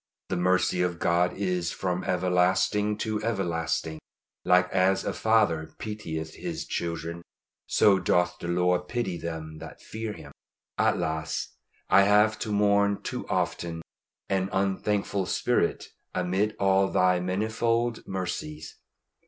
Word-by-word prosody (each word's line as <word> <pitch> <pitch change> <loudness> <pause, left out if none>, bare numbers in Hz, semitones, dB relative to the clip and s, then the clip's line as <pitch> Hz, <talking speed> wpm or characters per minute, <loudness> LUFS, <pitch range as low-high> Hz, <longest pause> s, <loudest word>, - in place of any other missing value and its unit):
The - - 0
mercy 90 0 +2
of 90 -1 0
God 85 +1 +2
is 90 -3 -1
from 90 -1 -2
everlasting 95 +3 +1
to 110 -1 -2
everlasting. 85 -7 -1 0.4
Like 90 0 +4
as 95 +1 +2
a - - -1
father 105 -9 +2
pitieth 80 -8 -5
his - - -4
children, 85 0 -4 0.5
so 100 -2 +4
doth 90 0 +1
the - - -5
Lord 90 +1 +1
pity 120 -7 -2
them 80 -2 -6
that - - -10
fear 110 -1 -5
Him. - - -11 0.4
Alas! 80 -1 0 0.4
I 100 - +6
have 105 +2 +4
to 110 - -3
mourn 100 0 +2
too - - -4
often 80 -1 -2 0.4
an 95 -1 0
unthankful 100 0 0
spirit - - 0 0.3
amid 95 +4 0
all 95 0 +3
Thy 90 -1 +3
manifold 110 +5 -1
mercies. 80 -5 -5
90 Hz, 125 wpm, -27 LUFS, 85-105 Hz, 0.5 s, I